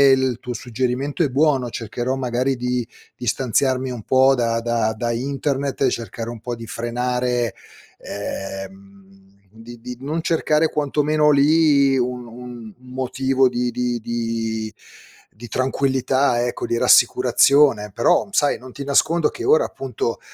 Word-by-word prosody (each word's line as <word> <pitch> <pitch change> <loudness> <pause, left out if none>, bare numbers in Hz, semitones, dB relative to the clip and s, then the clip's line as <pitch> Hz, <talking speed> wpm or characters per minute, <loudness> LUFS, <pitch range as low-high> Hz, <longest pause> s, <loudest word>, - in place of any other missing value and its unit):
il 130 -3 0
tuo 125 - -5
suggerimento 130 +6 -2
è 145 - +1
buono, 135 -2 +2
cercherò 120 +3 -3
magari 130 +1 -1
di 125 -1 -2 0.3
distanziarmi 130 +2 0
un 120 -3 -6
po' 130 +3 +4
da 115 -2 0
da 115 -2 0
da 120 +2 -2
internet 140 +3 -2
e 130 - +3
cercare 115 0 -5
un 120 - -9
po' 120 0 -4
di 115 - -9
frenare 125 0 -1 0.5
ehm, 95 -1 -8 0.3
di 115 +2 -12
di 125 0 -7
non 155 +4 -2
cercare 160 -1 +1
quanto 150 0 0
meno 150 0 +3
lì, 145 -2 +4
un 125 -1 -2
un 125 +1 -10 0.2
un 125 0 -14
motivo 130 0 +1
di 125 0 -1
di 120 0 -2
di 115 -1 -3 0.6
di 120 +3 -11
tranquillità 130 -1 +1
ecco, 120 - -3
di 120 - -1
rassicurazione. 135 -8 +4
Però 115 - +2
sai, 145 -7 +2
non 130 0 -12
ti 140 +3 -7
nascondo 155 +4 +2
che 370 - -7
ora 465 +4 +4
appunto, 125 -3 -4
125 Hz, 145 wpm, -21 LUFS, 115-135 Hz, 0.6 s, po